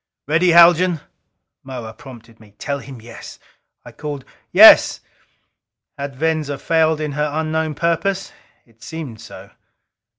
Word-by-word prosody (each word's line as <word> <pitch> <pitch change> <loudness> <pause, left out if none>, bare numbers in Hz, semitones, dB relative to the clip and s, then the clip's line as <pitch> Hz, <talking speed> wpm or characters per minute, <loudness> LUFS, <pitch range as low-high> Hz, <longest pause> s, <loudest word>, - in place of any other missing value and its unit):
"Ready, 165 +4 +2
Haljan?" 170 0 +5 0.6
Moa 120 -4 -8
prompted 115 -3 -15
me. 105 -2 -20
"Tell 140 -1 -4
him 135 -2 -11
yes!" 120 +1 -12 0.5
I - - -11
called, 145 -3 -7 0.3
"Yes!" - - +7 0.9
Had 140 -1 -7
Venza 155 -1 -2
failed 160 0 +1
in 155 -1 -4
her 150 +1 -2
unknown 155 0 -2
purpose? 170 +5 -2 0.3
It 115 -1 -30
seemed 145 -9 -8
so. - - -13
150 Hz, 125 wpm, -19 LUFS, 130-160 Hz, 0.9 s, Yes